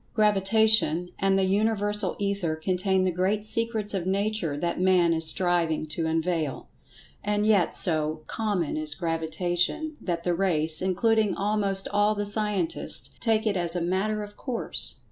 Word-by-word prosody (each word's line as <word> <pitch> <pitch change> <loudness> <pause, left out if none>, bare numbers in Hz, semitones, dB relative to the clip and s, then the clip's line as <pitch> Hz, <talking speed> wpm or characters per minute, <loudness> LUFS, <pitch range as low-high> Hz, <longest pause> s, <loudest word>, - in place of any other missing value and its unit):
Gravitation 210 -4 +4
and 195 0 +1
the 195 - +1
Universal 205 0 0
Ether 200 -5 -2
contain 185 +3 -1
the 185 - 0
great 190 +4 -1
secrets 220 -2 -1
of 185 -2 -3
Nature 195 -6 -1
that 170 +3 -3
Man 180 -2 +3
is 160 0 +5
striving 170 -3 +1
to 160 +1 -3
unveil. 160 -3 -2 0.5
And 210 0 -1
yet, 205 -6 +2
so 155 -2 +1
"common" 200 -9 -3
is 155 -1 0
Gravitation 175 - -2
that 170 -2 -4
the 175 - 0
race, 160 -4 +3
including 210 +3 +1
almost 200 -1 -2
all 205 +1 +1
the 205 0 -3
scientists, 205 -4 -1
take 225 -1 0
it 210 -2 0
as 175 -1 +1
a - - 0
"matter 195 +5 -1
of 205 0 -11
course." 250 -4 -3
190 Hz, 150 wpm, -25 LUFS, 170-210 Hz, 0.5 s, is